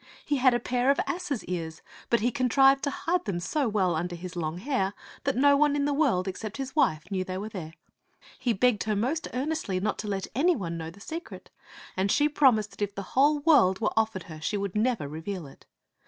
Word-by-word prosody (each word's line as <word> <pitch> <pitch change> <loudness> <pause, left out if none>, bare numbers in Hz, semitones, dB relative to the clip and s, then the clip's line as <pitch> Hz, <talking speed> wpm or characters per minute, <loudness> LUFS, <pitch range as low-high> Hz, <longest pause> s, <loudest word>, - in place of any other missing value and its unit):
He 290 - +1
had 255 -1 +4
a - - +1
pair 250 +2 0
of 280 - +3
asses' 340 -9 -3
ears, 165 -3 -5 0.3
but 235 - +3
he 240 +3 +2
contrived 270 +1 +4
to - - +1
hide 345 +5 -1
them 195 -5 -2
so 260 - 0
well 190 -4 +1
under 175 +2 -2
his 180 +1 -8
long 160 -1 -3
hair 205 -3 -1 0.3
that 275 - +1
no 285 +2 +5
one 290 0 +3
in 285 -1 +1
the 290 - +1
world 255 -11 +2
ex 190 - -4
cept 215 +1 -6
his 270 0 -5
wife 155 - +1
knew 190 -1 0
they 185 0 -5
were 205 +3 -5
there. 165 -6 -7 0.6
He 255 -2 +1
begged 230 +1 +2
her 215 -1 0
most 260 +10 -1
earnestly 260 -8 -2
not 210 +3 -2
to 215 - -4
let 195 -2 -2
any 330 - +3
one 170 -7 -4
know 160 -1 -5
the 175 +5 -14
secret, 325 +11 -8 0.4
and 190 +1 +1
she 295 - +4
promised 255 -8 +3
that - - -14
if 205 -1 -2
the 200 - -4
whole 290 +3 +4
world 275 - +5
were 225 - 0
offered 220 -4 0
her, 155 -2 -10
she 205 +6 -1
would 200 -2 -3
never 220 - +1
reveal 160 +4 -5
it. 135 - -16
220 Hz, 230 wpm, -27 LUFS, 185-275 Hz, 0.6 s, no